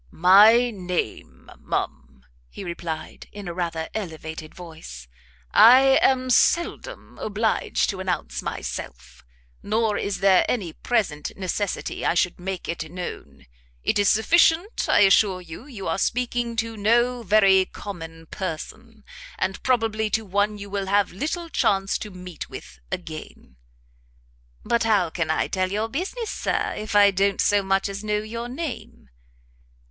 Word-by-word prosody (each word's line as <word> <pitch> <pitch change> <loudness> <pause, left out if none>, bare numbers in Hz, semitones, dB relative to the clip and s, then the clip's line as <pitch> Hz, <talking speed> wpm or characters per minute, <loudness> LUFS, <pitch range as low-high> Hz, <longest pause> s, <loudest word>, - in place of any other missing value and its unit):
"My 215 +7 +6
name, 180 - -5
ma'am," 65 - -4 0.3
he - - -9
replied, 170 -3 -6
in 205 -2 -9
a 170 - -4
rather 165 -2 -3
elevated 160 -5 -6
voice, 160 - -10 0.4
"I 265 +3 +7
am 255 -1 +2
seldom 340 +7 0
obliged 215 +1 0
to 190 - -8
announce 185 -2 -3
myself; - - -7 0.4
nor 215 0 0
is 200 -1 -2
there 195 -1 +5
any 185 -10 -2
present 165 -12 -1
necessity 195 +1 -3
I - - +1
should 175 0 +1
make 185 0 -5
it 165 -2 -4
known. 180 +1 -8 0.4
It - - +1
is 205 - +4
sufficient 330 - +3
I - - +5
assure 195 -1 +4
you, 180 - -11
you 220 -9 -7
are - - -1
speaking 240 +1 -1
to 225 0 -2
no 240 +4 +2
very 195 -3 +4
common 165 -6 -9
person, 210 +7 -7 0.3
and 190 +1 -2
probably 225 -4 0
to 220 +1 -1
one 205 +2 0
you 200 -1 -9
will 200 -1 -2
have 200 0 +2
little 315 - -3
chance 195 -10 +1
to 210 - -6
meet 180 -3 -9
with 60 - -10
again." 65 - -8 1.1
"But 235 - +1
how 205 -7 +2
can 170 -2 -2
I 160 - +1
tell 185 -1 -1
your 215 +3 -1
business, 385 - -4
Sir, - - -1
if 215 -1 -5
I 205 -1 +7
don't 195 0 +1
so 205 0 +3
much 195 0 0
as 200 +1 -6
know 210 0 0
your 230 +3 -5
name?" 280 - -6
200 Hz, 145 wpm, -24 LUFS, 180-225 Hz, 1.1 s, I